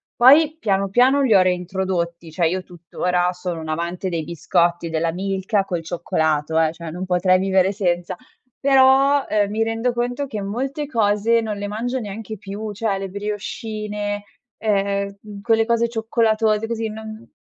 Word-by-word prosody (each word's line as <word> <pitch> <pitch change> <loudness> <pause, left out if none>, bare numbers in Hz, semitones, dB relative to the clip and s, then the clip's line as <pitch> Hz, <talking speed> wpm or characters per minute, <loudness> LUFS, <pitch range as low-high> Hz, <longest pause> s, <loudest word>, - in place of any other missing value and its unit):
Poi, 300 +5 +6
piano, 195 -4 0
piano, 255 +7 +4
li 260 -5 +3
ho 195 - +7
reintrodotti, 180 -2 -2
cioè, 165 +1 +1
io 185 +2 -2
tuttora 180 +1 -1
sono 180 -2 -5
un 160 - -7
amante 170 +4 -3
dei 165 -3 -2
biscotti 170 +1 0
della 165 +1 0
Milka 195 +3 -1
col 175 -3 -3
cioccolato, 160 -2 0
eh, 160 -1 +3
cioè, 165 -1 -8
non 180 +3 -5
potrei 185 +1 +3
vivere 190 0 +2
senza. 175 -4 -1 0.4
Però, 275 +1 +5
uhm, 205 -1 +1
mi 220 +2 0
rendo 225 +2 0
conto 245 +4 -2
che 220 -6 -5
molte 265 +8 -3
cose 225 -3 +2
non 215 -2 -4
le 200 - -4
mangio 240 +5 -2
neanche 215 0 -6
più, 205 +2 -6
cioè, 205 -1 -1
le 195 0 -5
briochine, 210 0 -4 0.3
ehm, 200 0 -2
quelle 225 +1 +2
cose 235 0 +2
cioccolatose, 225 -1 +1
così, 225 -1 -2
non 220 +1 -9
205 Hz, 160 wpm, -21 LUFS, 180-225 Hz, 0.4 s, ho